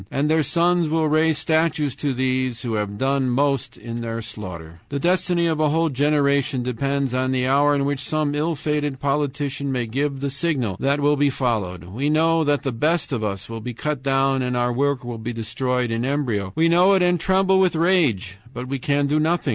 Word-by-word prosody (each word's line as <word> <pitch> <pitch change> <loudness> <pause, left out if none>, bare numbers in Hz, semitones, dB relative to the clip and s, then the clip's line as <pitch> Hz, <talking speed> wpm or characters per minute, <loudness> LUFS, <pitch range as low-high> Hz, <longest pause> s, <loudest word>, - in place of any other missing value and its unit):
And 145 +3 0
their 160 0 +3
sons 170 +3 +2
will 160 0 +1
raise 155 0 +2
statues 155 -3 +1
to 145 -1 -1
those 130 -2 -1
who 120 -2 -3
have 105 -1 -2
done 135 +1 0
most 135 +1 0
in 115 0 -6
their 115 0 -4
slaughter. 85 -7 -8
"The 140 - -3
destiny 175 +1 +1
of 160 -2 0
a 155 -1 +3
whole 165 +2 +1
generation 140 -1 +1
depends 135 +2 -1
on 130 0 0
the 130 -1 0
hour 145 +2 +3
in 140 -1 0
which 140 -1 -1
some 150 +1 -1
ill 155 +3 -1
fated 145 -2 -2
politician 140 0 -2
may 125 -2 -1
give 135 +4 -2
the 140 0 -2
signal 140 - -1
that 140 +2 +1
will 145 +1 +3
be 145 0 +3
followed. 110 - -2
We 115 +12 -3
know 165 +1 +3
that 145 -1 +1
the 135 - -1
best 155 +8 0
of 120 -5 -2
us 100 -2 -3
will 115 0 -7
be 120 +1 -6
cut 150 +1 -3
down 135 0 +1
and 125 -1 -1
our 120 0 +1
work 140 0 0
will 120 -2 -5
be 120 +2 -4
destroyed 120 +2 -2
in 115 +1 -1
embryo. 125 -8 -1
WE 165 +1 +3
KNOW 180 +4 +5
IT 190 -2 +3
AND 175 -1 +2
TREMBLE 190 +2 +2
WITH 185 -3 +2
RAGE, 155 - +1
BUT 125 -1 -6
WE 135 +1 -3
CAN 145 +2 +1
DO 150 +2 +1
NOTHING. 160 -1 0
140 Hz, 215 wpm, -22 LUFS, 125-155 Hz, -, KNOW